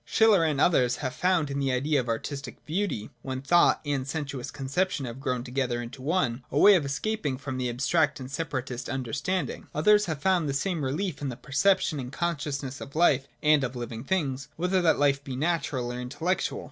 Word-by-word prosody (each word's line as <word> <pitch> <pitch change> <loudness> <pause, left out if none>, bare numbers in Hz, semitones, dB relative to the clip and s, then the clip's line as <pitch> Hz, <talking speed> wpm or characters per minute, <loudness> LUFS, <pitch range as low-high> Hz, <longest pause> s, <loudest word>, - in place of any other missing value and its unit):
Schiller, 215 -6 +4
and 150 -4 +1
others, 125 -7 +3
have 130 -1 -4
found 170 -1 +1
in 140 - -2
the 135 -1 +1
idea 140 +3 +1
of 120 -2 -3
artistic 135 +3 -5
beauty, 160 - -2
where 130 0 -4
thought 170 +6 +4
and 140 -2 -1
sensuous 140 -4 -4
conception 140 +3 -1
have 120 +1 -7
grown 125 -2 -2
together 125 -1 -1
into 120 +2 -7
one, 130 -5 0
a 140 - -2
way 205 +7 +8
of 180 -6 +3
escape 215 +11 -2 0.2
from 135 -2 -5
the 125 -1 -1
abstract 140 +6 +1
and 130 0 -8
separatist 135 -5 -4
under 130 -4 -3
standing. 180 +1 -2
Others 210 +7 +4
have 160 -4 -3
found 175 -1 +2
the 140 - -1
same 170 0 -1
relief 155 +5 -2
in 140 - -2
the 125 - -5
perception 155 +3 +1
and 125 -1 -6
consciousness 145 -5 -3
of 140 - -9
life 140 -5 +3 0.2
and 150 -2 +5
of 125 0 -3
living 120 -1 -5
things, 140 -5 -1
whether 180 +2 +1
that 165 -2 +4
life 140 -1 +2
be 135 -2 -5
natural 140 -5 -1
or 125 - -5
intellectual. 145 +9 -2
140 Hz, 200 wpm, -27 LUFS, 130-165 Hz, 0.2 s, way